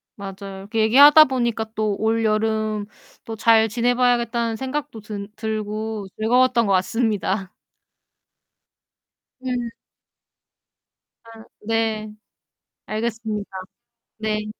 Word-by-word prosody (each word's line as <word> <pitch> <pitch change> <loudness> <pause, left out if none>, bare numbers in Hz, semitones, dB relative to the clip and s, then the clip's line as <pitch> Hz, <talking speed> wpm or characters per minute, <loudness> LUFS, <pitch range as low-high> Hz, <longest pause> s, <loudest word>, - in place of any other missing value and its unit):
맞아요. 195 -1 -8
이렇게 215 +3 -4
얘기하다 285 +7 +8
보니까 240 -4 -1
또 215 -2 0
올여름 215 -1 0 0.4
또 225 - -6
잘 225 0 +4
지내 240 +3 +1
봐야겠다는 235 -2 +1
생각도 265 0 -4
든 205 -1 -7
들고 215 -1 -4
즐거웠던 240 +1 +3
것 200 - +1
같습니다. 195 -1 0 1.9
음. 245 -2 -2 1.5
아 225 -1 -14 0.2
네. 220 -1 -1 0.7
알겠습니다. 220 -1 -3 0.7
네. 215 -1 -2
220 Hz, 205 characters per minute, -22 LUFS, 215-235 Hz, 1.9 s, 얘기하다